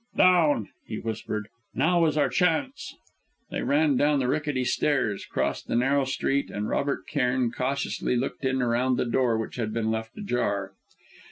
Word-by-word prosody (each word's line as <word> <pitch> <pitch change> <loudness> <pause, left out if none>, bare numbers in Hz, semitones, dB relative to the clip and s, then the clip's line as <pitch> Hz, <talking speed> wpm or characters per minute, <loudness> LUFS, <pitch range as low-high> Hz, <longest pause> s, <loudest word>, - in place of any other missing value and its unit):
"Down!" 165 - +4 0.2
he 110 - -4
whispered. 110 -1 -4 0.3
"Now 170 0 +3
is 155 -1 -1
our 145 - +3
chance!" 195 - 0 0.6
They - - -2
ran 145 -1 +2
down 145 +1 +3
the 130 -2 0
rickety 145 -1 0
stairs, 120 -8 0
crossed - - -2
the - - -1
narrow 135 +3 +2
street, 135 +1 -1
and 105 +1 -3
Robert 140 0 -1
Cairn 125 -4 0
cautiously 130 0 -1
looked 130 +3 -3
in 130 -1 +1
around 125 +2 +1
the - - 0
door 120 -1 +1
which 110 +2 -5
had 110 -3 -2
been 110 0 -1
left 110 0 -4
ajar. 105 - -1
130 Hz, 165 wpm, -26 LUFS, 115-145 Hz, 0.6 s, Down